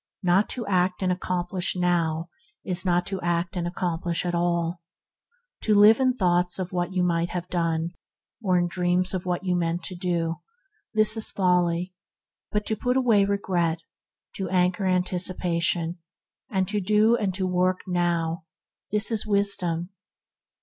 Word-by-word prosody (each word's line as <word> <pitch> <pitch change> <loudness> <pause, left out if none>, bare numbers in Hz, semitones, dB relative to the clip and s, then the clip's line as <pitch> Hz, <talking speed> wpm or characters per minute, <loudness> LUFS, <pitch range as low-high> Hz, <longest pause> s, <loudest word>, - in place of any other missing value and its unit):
Not 185 +3 +3
to 240 -3 -4
act 185 -1 0
and 185 - +1
accomplish 180 0 -1
now 170 -2 0 0.3
is 185 -1 0
not 175 -1 +1
to 195 -1 -4
act 175 +2 -1
and 175 -1 -2
accomplish 175 -1 -2
at 175 - -1
all. 170 0 -1 0.8
To 215 - +2
live 210 +3 +7
in 260 -1 +3
thoughts 180 -6 +1
of 185 -1 -4
what 175 0 -1
you 185 -1 0
might 170 -1 0
have 180 0 -4
done, 165 -1 -1 0.5
or 185 -4 +2
in 175 0 +1
dreams 180 +1 0
of 185 -1 -4
what 180 +1 -1
you 180 -1 0
mean 170 -1 0
to 185 - -3
do, 170 -2 -2 0.6
this 215 0 +6
is 220 - +2
folly; 180 -1 +1 0.6
but 210 0 -1
to 220 - -1
put 250 +4 0
away 225 -6 +4
regret, 180 -5 0 0.6
to 190 -2 -3
anchor 180 +1 +1
anticipation, 180 -2 0 0.5
and 190 -2 0
to 210 0 0
do 215 +4 +3
and 205 -5 -1
to 190 -1 -1
work 185 0 +1
now, 170 -2 -1 0.5
this 210 +2 +3
is 220 -1 +2
wisdom. 190 -4 0
180 Hz, 155 wpm, -25 LUFS, 175-195 Hz, 0.8 s, live